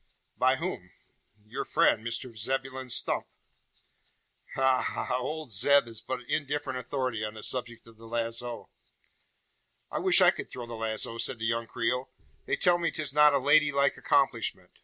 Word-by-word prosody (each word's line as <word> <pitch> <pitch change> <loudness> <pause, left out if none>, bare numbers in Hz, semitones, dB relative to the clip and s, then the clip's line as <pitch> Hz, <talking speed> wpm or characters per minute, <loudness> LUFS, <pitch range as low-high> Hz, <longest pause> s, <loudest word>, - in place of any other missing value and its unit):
"By 130 +1 +3
whom?" 155 - -5 0.6
"Your 105 - -4
friend, 110 - +2
Mr 120 +1 -3
Zebulon 130 +3 -3
Stump." - - 0 1.3
"Ha 130 -1 +3
ha! 125 +2 -2
Old 150 +1 -5
Zeb 140 +7 +4
is 115 -1 -6
but 130 -1 -4
indifferent 145 -3 -2
authority 125 -3 -3
on 105 0 -4
the 110 - -9
subject 120 -2 -3
of 115 -1 -17
the 115 0 -13
lazo." 115 +1 -3 1.2
"I - - -2
wish - - +4
I - - +7
could - - -7
throw 120 - -7
the 120 - -9
lazo," 115 0 -1
said 125 - 0
the 110 - -4
young 115 0 -1
Creole. 125 +4 -1 0.4
"They - - +1
tell 175 -1 +4
me 170 - +1
'tis 150 -4 -2
not 150 -1 +6
a - - +5
lady 145 +2 +4
like 140 0 +2
accomplishment. - - 0
125 Hz, 165 wpm, -28 LUFS, 115-140 Hz, 1.3 s, I